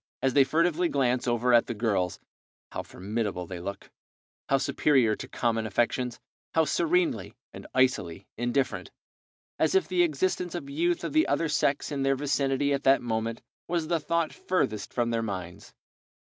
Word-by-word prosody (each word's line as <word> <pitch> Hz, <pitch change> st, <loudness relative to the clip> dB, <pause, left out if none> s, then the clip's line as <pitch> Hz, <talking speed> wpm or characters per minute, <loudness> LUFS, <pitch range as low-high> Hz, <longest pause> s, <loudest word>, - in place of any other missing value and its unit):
As 135 Hz, -1 st, +2 dB
they 140 Hz, -, +6 dB
furtively 170 Hz, +4 st, +1 dB
glance 125 Hz, -2 st, +1 dB
over 120 Hz, +1 st, +2 dB
at 120 Hz, -, +5 dB
the 120 Hz, -, -3 dB
girls, 100 Hz, -5 st, 0 dB, 0.5 s
how -, -, -3 dB
formidable 100 Hz, -2 st, -3 dB
they 90 Hz, 0 st, -7 dB
look, 100 Hz, +3 st, -7 dB, 0.6 s
how 135 Hz, -, +4 dB
superior 130 Hz, -4 st, +2 dB
to -, -, -8 dB
common 115 Hz, -2 st, -1 dB
affections, 120 Hz, +3 st, 0 dB, 0.4 s
how 160 Hz, -1 st, +4 dB
serenely 165 Hz, -, 0 dB, 0.2 s
and -, -, -10 dB
icily 100 Hz, -9 st, +1 dB
indifferent, 120 Hz, -, -1 dB, 0.7 s
as 160 Hz, -, +2 dB
if 190 Hz, -, +3 dB
the 180 Hz, -1 st, +2 dB
existence 175 Hz, +2 st, 0 dB
of 140 Hz, -5 st, -6 dB
youth 170 Hz, +4 st, 0 dB
of -, -, -3 dB
the 315 Hz, +1 st, +4 dB
other 165 Hz, -, +1 dB
sex 145 Hz, 0 st, 0 dB
in 140 Hz, -1 st, -2 dB
their 135 Hz, 0 st, +2 dB
vicinity 140 Hz, 0 st, +1 dB
at 140 Hz, -, 0 dB
that 135 Hz, -1 st, +4 dB
moment 115 Hz, 0 st, -2 dB, 0.2 s
was 170 Hz, -2 st, -1 dB
the 170 Hz, -1 st, +2 dB
thought 170 Hz, +1 st, -1 dB
furthest 110 Hz, -, -1 dB
from 120 Hz, -1 st, 0 dB
their 115 Hz, -1 st, 0 dB
minds! 90 Hz, -5 st, -6 dB
130 Hz, 165 wpm, -28 LUFS, 110-155 Hz, 0.7 s, they